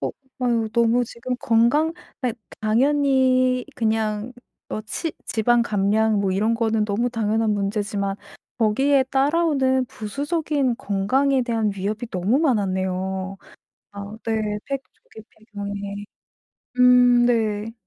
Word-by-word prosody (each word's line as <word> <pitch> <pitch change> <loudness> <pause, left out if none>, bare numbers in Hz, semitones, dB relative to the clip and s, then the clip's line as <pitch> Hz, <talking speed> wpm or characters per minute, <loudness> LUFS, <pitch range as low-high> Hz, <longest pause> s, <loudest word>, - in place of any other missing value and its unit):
어 - - -1
어우 - - -7 0.3
막 235 -3 0
너무 235 +1 +3
지금 235 +2 -5
건강 240 +8 +3 0.3
예 240 - 0 0.3
당연히 255 +1 +2
그냥 220 0 -1 0.4
어 - - -4
치 300 +9 -4
지방 235 +2 +2
감량 215 0 +1
뭐 195 -1 0
이런 210 +5 +1
거는 225 -2 +1
너무 215 +4 0
당연한 220 -1 0
문제지만 200 -1 -2 0.4
거기에 265 +5 +3
따라오는 270 -1 +1
부수적인 280 - -2
건강에 255 +8 +1
대한 225 -3 0
위협이 210 +5 -3
너무 190 +8 +1
많았네요. 190 - -1 0.5
아, 200 +1 -8
네. 215 -2 -1
폐경 275 -1 -2
조기 220 - -16 0.3
폐경이. 200 0 -5 0.7
음. 250 -1 +6
네. 220 -2 0
225 Hz, 240 characters per minute, -22 LUFS, 205-255 Hz, 0.7 s, 음